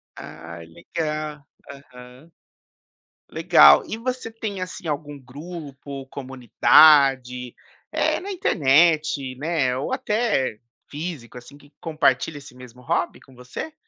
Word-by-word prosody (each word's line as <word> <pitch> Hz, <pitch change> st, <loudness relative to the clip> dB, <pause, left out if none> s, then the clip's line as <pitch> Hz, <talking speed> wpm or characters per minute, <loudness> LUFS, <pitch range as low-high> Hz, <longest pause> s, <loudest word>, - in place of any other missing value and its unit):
Ai 85 Hz, +1 st, -10 dB
legal, 150 Hz, -, -5 dB, 0.2 s
aham 130 Hz, +1 st, -14 dB, 1.0 s
legal, 70 Hz, 0 st, +6 dB
e 220 Hz, -, -5 dB
você 250 Hz, 0 st, -4 dB
tem, 215 Hz, -4 st, -6 dB
assim, 185 Hz, -1 st, -7 dB
algum 145 Hz, -1 st, -4 dB
grupo, 140 Hz, 0 st, -9 dB
comunidade, 130 Hz, -1 st, +3 dB, 0.4 s
eh, -, -, 0 dB
na 400 Hz, +3 st, -7 dB
internet, 155 Hz, -, +2 dB
né, 145 Hz, -4 st, -1 dB
ou 135 Hz, -, -4 dB
até 215 Hz, -, -1 dB, 0.3 s
físico, 145 Hz, -6 st, -7 dB
assim, 125 Hz, +4 st, -13 dB
que 145 Hz, 0 st, -22 dB
compartilha 155 Hz, -2 st, 0 dB
esse 140 Hz, -2 st, -13 dB
mesmo 125 Hz, -1 st, -14 dB
hobby 170 Hz, +4 st, -2 dB
com 135 Hz, -, -20 dB
você? 125 Hz, -, -8 dB
145 Hz, 110 wpm, -22 LUFS, 125-165 Hz, 1.0 s, legal